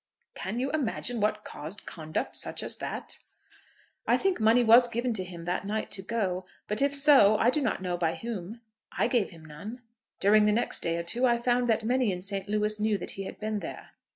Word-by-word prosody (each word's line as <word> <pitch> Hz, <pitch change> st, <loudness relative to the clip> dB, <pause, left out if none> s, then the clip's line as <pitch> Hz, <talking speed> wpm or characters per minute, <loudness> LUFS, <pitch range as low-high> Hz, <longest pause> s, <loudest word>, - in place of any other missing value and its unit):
"Can 235 Hz, -, -4 dB
you 270 Hz, +2 st, -1 dB
imagine 245 Hz, -5 st, -1 dB
what 210 Hz, 0 st, 0 dB
caused 160 Hz, +8 st, -8 dB
conduct 155 Hz, -2 st, -4 dB
such -, -, -1 dB
as -, -, -3 dB
that?" -, -, -5 dB, 0.9 s
"I -, -, +4 dB
think 385 Hz, -6 st, 0 dB
money 225 Hz, +3 st, +5 dB
was 235 Hz, +2 st, +7 dB
given 240 Hz, +1 st, -1 dB
to 195 Hz, -4 st, -1 dB
him 175 Hz, -2 st, -9 dB
that 175 Hz, +2 st, -2 dB
night 215 Hz, +1 st, -2 dB
to 200 Hz, -, -1 dB
go; 190 Hz, -3 st, -2 dB, 0.2 s
but 210 Hz, +3 st, -1 dB
if 280 Hz, 0 st, +2 dB
so, 275 Hz, -8 st, +6 dB
I 235 Hz, +3 st, +4 dB
do 300 Hz, -, +1 dB
not 225 Hz, -7 st, -1 dB
know 180 Hz, -1 st, -1 dB
by 165 Hz, -1 st, 0 dB
whom. 225 Hz, -1 st, -6 dB, 0.4 s
I -, -, +3 dB
gave 240 Hz, -6 st, +1 dB
him 165 Hz, -3 st, -14 dB
none. 205 Hz, +12 st, -9 dB, 0.4 s
During 210 Hz, +1 st, +5 dB
the 210 Hz, -, +3 dB
next 235 Hz, -, 0 dB
day 170 Hz, 0 st, -1 dB
or 170 Hz, -, -2 dB
two 240 Hz, +9 st, +1 dB
I 240 Hz, -1 st, +3 dB
found 245 Hz, 0 st, +1 dB
that 225 Hz, -1 st, +2 dB
many 245 Hz, -1 st, +2 dB
in 180 Hz, -, -3 dB
St. 195 Hz, +1 st, -2 dB
Louis 210 Hz, 0 st, 0 dB
knew 215 Hz, -1 st, +1 dB
that 175 Hz, -, -6 dB
he 195 Hz, -, -6 dB
had -, -, -8 dB
been 215 Hz, 0 st, -2 dB
there." -, -, -8 dB
215 Hz, 220 wpm, -28 LUFS, 190-240 Hz, 0.9 s, was